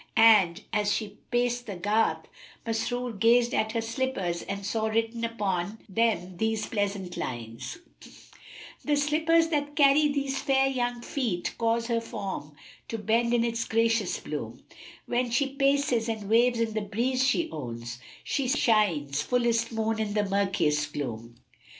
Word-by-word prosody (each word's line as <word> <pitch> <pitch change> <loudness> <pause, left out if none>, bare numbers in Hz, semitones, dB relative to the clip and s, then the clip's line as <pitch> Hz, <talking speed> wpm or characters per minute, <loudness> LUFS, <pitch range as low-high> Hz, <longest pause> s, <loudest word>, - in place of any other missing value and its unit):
And, 210 -4 +6
as 205 -1 +1
she 210 -1 -3
paced 245 0 0
the 200 - -5
garth, 210 +5 +1 0.4
Masrur 235 +2 -2
gazed 235 +2 +4
at 220 0 0
her 230 - 0
slippers 225 -7 -2
and 200 0 -5
saw 220 +2 0
written 225 +1 -1
upon 205 -3 -2
them 190 -4 0
these 220 0 0
pleasant 200 -4 -3
lines, 115 - -5 1.1
"The 295 - +2
slippers 320 +3 +3
that 290 -2 -1
carry 295 0 +5
these 275 -2 -1
fair 270 -1 +3
young 245 -2 -1
feet 225 -11 -2
* - - -29
Cause 230 0 +1
her 230 -1 0
form 190 -9 -6 0.3
to 225 - -4
bend 230 +2 +1
in 240 -1 +3
its 230 -1 -1
gracious 225 -3 +1
bloom: - - -6 0.4
When 245 0 0
she 270 +4 +1
paces 275 -4 +2
and 215 -3 -4
waves 240 +1 +4
in 225 -1 0
the 215 - -1
breeze 240 +6 0
she 320 +5 +1
owns, 120 -3 -6
* - - -21
She 275 -2 -1
shines 200 - +2
fullest 235 +3 +1
moon 225 0 -1
in 215 -1 -2
the 205 -1 +1
murkiest 180 -7 +1
gloom." 115 -4 -5
225 Hz, 155 wpm, -27 LUFS, 200-245 Hz, 1.1 s, And